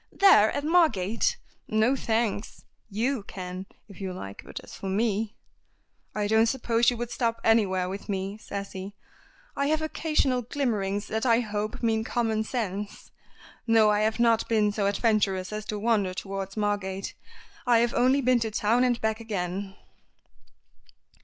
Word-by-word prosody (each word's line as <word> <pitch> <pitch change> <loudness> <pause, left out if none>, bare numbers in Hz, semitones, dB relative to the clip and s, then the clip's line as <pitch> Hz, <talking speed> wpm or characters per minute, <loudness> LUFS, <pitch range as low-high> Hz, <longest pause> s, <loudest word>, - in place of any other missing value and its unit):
"There! 300 - +6
At 285 - -3
Margate? 305 - +2 0.3
No, 220 +5 +2
thanks. 225 -4 -2 0.3
You 230 +4 -1
can, 185 -1 -7 0.2
if 200 -2 -13
you 190 -1 -3
like, 100 - -8
but - - -8
as - - -13
for 195 - -7
me 215 +1 0 0.4
" - - -43
"I 210 -1 0
don't 220 +2 +4
suppose 235 -1 +2
you 245 - -2
would 240 0 -4
stop 230 -2 -1
anywhere 195 -5 +3
with 195 +3 -7
me," 195 +1 -3
says 200 -2 -6
he. 195 +2 -7 0.6
"I 280 - 0
have 310 +1 +1
occasional 305 -5 0
glimmerings 215 -6 -1
that 220 0 -2
I 235 -1 +4
hope 215 0 -4
mean 220 -1 +2
common 225 -2 0
sense. 210 -4 -4 0.6
No, 225 -2 +5
I 210 - +2
have 220 +2 0
not 230 -1 +3
been 215 -2 +3
so 205 -1 0
adventurous 200 -2 +1
as 215 0 -4
to 215 - -3
wander 205 -4 +1
towards 195 +1 -5
Margate. 200 -2 -2 0.5
I 240 -1 +6
have 235 0 +1
only 260 +3 +3
been 255 -1 +3
to 225 -1 -1
town 220 +3 +2
and 245 -2 +2
back 220 0 0
again." 195 -3 -4
220 Hz, 160 wpm, -27 LUFS, 200-235 Hz, 0.6 s, There